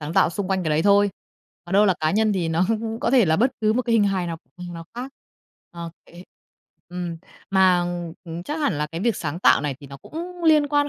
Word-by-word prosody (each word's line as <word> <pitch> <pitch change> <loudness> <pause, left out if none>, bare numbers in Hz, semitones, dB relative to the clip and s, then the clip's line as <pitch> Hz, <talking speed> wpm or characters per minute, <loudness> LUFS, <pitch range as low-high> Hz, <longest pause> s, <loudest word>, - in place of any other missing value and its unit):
sáng 150 +1 -5
tạo 165 - +4
xung 190 +2 -4
quanh 190 -1 0
cái 155 - -1
đấy 155 +2 +2
thôi. 205 0 +4 0.5
Còn 175 - -9
đâu 205 +2 +5
là 190 - +3
cá 155 0 +2
nhân 215 +2 +2
thì 175 -4 -1
nó 165 +3 +2 0.4
có - - +1
thể 250 -5 +5
là 160 -1 +2
bất 250 +7 +3
cứ 215 0 +3
một 250 +3 0
cái 235 -1 -1
hình 220 -2 +4
hài 190 -3 0
nào, 165 -1 -4 0.2
ừm, 175 -1 -8
nào 165 0 -8
khác. 250 +3 -6 0.6
Ờ, 170 -1 -7 0.2
kể 175 +1 -13 0.7
ừm, 175 -1 -5 0.3
mà, 190 -2 +4
ừm, 175 -1 -4
ừm, 170 +1 -6
chắc 305 - -4
hẳn 280 - 0
là 150 - 0
cái 165 +2 -6
việc 225 0 +1
sáng 160 +1 -4
tạo 180 - +5
này 145 -2 -2
thì 140 - -11
nó 140 0 -10
cũng 345 - -8
liên 305 -2 +5
quan 290 0 +2
185 Hz, 255 wpm, -23 LUFS, 165-220 Hz, 0.7 s, đâu